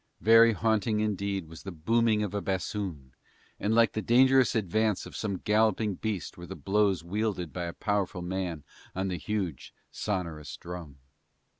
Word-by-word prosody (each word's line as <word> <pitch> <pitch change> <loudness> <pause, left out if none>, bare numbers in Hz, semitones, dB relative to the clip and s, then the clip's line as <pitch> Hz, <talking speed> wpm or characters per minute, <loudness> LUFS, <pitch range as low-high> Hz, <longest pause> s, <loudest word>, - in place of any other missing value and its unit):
Very 115 +1 +7
haunting 110 0 +1
indeed 100 -4 -1
was 80 0 -11
the 95 - -7
booming 110 +6 +2
of 105 - -3
a 100 - -1
bassoon, 95 -8 -3 0.5
and 110 +2 +1
like 115 -1 +5
the 110 - -2
dangerous 130 +2 +4
advance 110 0 +1
of - - -10
some 100 -3 -2
galloping 105 +1 +2
beast 100 -2 -4
were 85 - -8
the 95 - -7
blows 100 -3 +1
wielded 95 -2 -2
by 90 -1 -3
a 85 - -5
powerful 100 -4 -1
man 90 -4 -3 0.3
on 95 +1 -1
the 90 - -2
huge, 95 - -4 0.2
sonourous 80 -9 -4
drum. 85 -5 -8
100 Hz, 160 wpm, -29 LUFS, 90-110 Hz, 0.5 s, Very